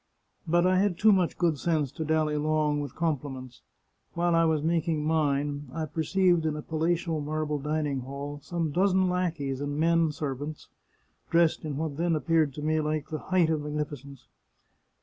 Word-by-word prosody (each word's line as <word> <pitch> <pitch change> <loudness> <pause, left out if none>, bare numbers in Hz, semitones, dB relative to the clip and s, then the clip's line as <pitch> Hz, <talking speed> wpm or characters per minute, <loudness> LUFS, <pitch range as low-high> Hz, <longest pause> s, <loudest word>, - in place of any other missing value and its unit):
" - - -48
But 175 +2 +3
I 185 0 +4
had 195 -3 +1
too 215 0 +5
much 185 -4 +2
good 165 -5 +1
sense 155 -6 0
to 160 - -5
dally 155 -1 +1
long 150 0 +1
with 145 -3 -6
com 160 -5 0
pliments. 130 -3 -9 0.5
While 170 0 +1
I 165 0 +4
was 155 -2 +1
making 160 -2 0
mine, 145 -2 0
I 160 0 -2
perceived 170 +3 +1
in 155 -1 -1
a 150 - -6
palatial 165 0 -1
marble 150 0 -2
dining 150 -1 -1
hall 140 +3 -6
some 165 0 -2
dozen 185 +2 +2
lackeys 165 -7 -2
and 145 0 -3
men 165 0 +3
servants, 145 +1 -5 0.6
dressed 170 -1 +3
in 145 -3 -3
what 155 -2 -3
then 170 0 +1
appeared 155 -1 +2
to 150 - -6
me 155 +1 +1
the 155 0 -2
height 180 -4 +3
of 155 -2 0
magnificence. 145 -2 -6
155 Hz, 175 wpm, -28 LUFS, 145-165 Hz, 0.6 s, too